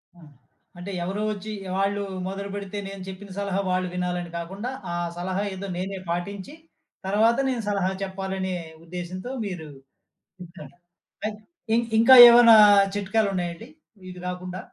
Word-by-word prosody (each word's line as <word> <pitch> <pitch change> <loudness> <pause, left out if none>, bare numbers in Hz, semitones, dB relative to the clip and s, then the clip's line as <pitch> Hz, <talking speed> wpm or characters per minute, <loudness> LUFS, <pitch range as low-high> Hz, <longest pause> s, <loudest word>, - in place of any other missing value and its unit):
ఆ! - - -19 0.6
అంటే 185 +3 -7
ఎవరో 195 +4 -3
వచ్చి 210 +1 -5 0.3
ఆళ్ళు 200 +1 0 0.3
మొదలు 200 +1 -5
బెడితే 200 0 -5
నేను 195 -1 -8
చెప్పిన 190 +1 -9
సలహా 200 -1 -1
వాళ్ళు 185 0 0
వినాలని 180 -1 -3
కాకుండా, 195 +8 -5 0.2
ఆ - - -2 0.2
సలహా 185 +3 -2
ఏదో 200 +1 -6
నేనే 190 +1 -4
పాటించి, 195 - -5 0.5
తర్వాత 220 +4 +3
నేను 245 -3 -2
సలహా 195 -2 0
చెప్పాలనే 190 -1 -4 0.3
ఉద్దేశంతో 180 +6 -7
మీరు 175 -6 -6 0.7
ఇంట్లోనే 170 -3 -13 0.5
పె 215 - 0 0.4
ఇన్ 235 +1 +2
ఇంకా 260 +3 +8
ఏమైనా 235 -1 +8 0.4
చిట్కాలున్నాయండి 200 -2 -1 0.4
ఇది 180 - -10
గాకుండా? 180 0 -6
190 Hz, 130 wpm, -24 LUFS, 180-205 Hz, 0.7 s, ఇంకా